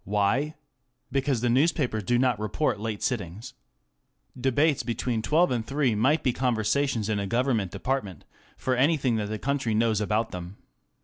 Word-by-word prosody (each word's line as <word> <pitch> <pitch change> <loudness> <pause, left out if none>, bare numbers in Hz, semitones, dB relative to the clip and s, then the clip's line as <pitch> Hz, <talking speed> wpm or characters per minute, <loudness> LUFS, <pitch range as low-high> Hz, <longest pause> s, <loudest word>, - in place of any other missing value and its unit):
Why? 105 - 0 0.6
Because 135 -2 0
the 120 - +1
newspapers 130 -4 +2
do 120 +5 +1
not 125 -3 +2
report 105 +2 -1
late 110 -1 -4
sittings. 110 -1 -3 0.8
Debates 135 +4 +2
between 115 0 -2
twelve 160 +8 +3
and 120 -3 0
three 135 0 0
might 135 +9 +2
be 125 - +2
conversations 120 -1 0
in 110 -2 0
a 100 - -2
Government 115 -3 +1
department 105 - -3 0.3
for 130 - 0
anything 135 -3 +2
that 105 -1 -2
the 110 - -3
country 135 -3 -1
knows 110 -1 +2
about 110 +2 0
them. 90 +2 -7
120 Hz, 160 wpm, -26 LUFS, 105-135 Hz, 0.8 s, twelve